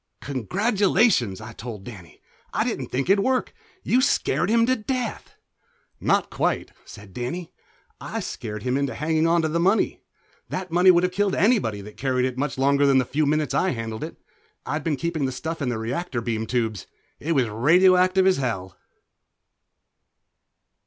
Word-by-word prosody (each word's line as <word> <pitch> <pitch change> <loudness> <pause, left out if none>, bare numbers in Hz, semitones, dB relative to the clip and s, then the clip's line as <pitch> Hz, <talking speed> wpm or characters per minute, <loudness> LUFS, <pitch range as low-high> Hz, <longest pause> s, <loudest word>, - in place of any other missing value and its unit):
"Congratulations," 185 - +1
I 110 0 -9
told 110 -3 -8
Danny. 95 -8 -12 0.3
"I - - +1
didn't - - -3
think 135 +4 -2
it'd 195 +1 +4
work. 260 -1 0 0.3
You 255 - +3
scared 180 - +1
him 230 +1 +4
to 255 +2 +2
death." 250 0 -4 0.6
"Not - - +1
quite," - - -1
said 100 -2 -13
Danny. 130 +9 -5 0.5
"I - - -5
scared 105 -1 -6
him 130 +1 0
into 140 -4 -1
hanging 160 +1 +1
onto 165 -1 +2
the 160 +2 -1
money. 190 +6 +2 0.5
That 185 -2 -4
money 180 +2 +5
would 175 -1 +6
have 180 - +1
killed 200 +1 0
anybody 195 - +2
that 105 +1 -12
carried 130 -1 0
it 130 -1 -2
much 140 +1 -2
longer 140 +1 +3
than 135 -1 +4
the 130 - +3
few 150 +4 0
minutes 150 -2 0
I 165 +5 +1
handled 115 -2 -5
it. - - -7 0.5
I'd 150 0 -3
been 150 -3 -1
keeping 170 -3 -2
the 130 - -1
stuff 160 +6 -5
in 135 - 0
the 120 - -2
reactor 125 +5 -3
beam 110 -1 -3
tubes. 110 -5 -2 0.3
It 165 +3 -1
was 130 -5 +2
radioactive 185 - +4
as 190 -1 +4
hell." 95 -9 -3
145 Hz, 170 wpm, -24 LUFS, 120-185 Hz, 0.6 s, would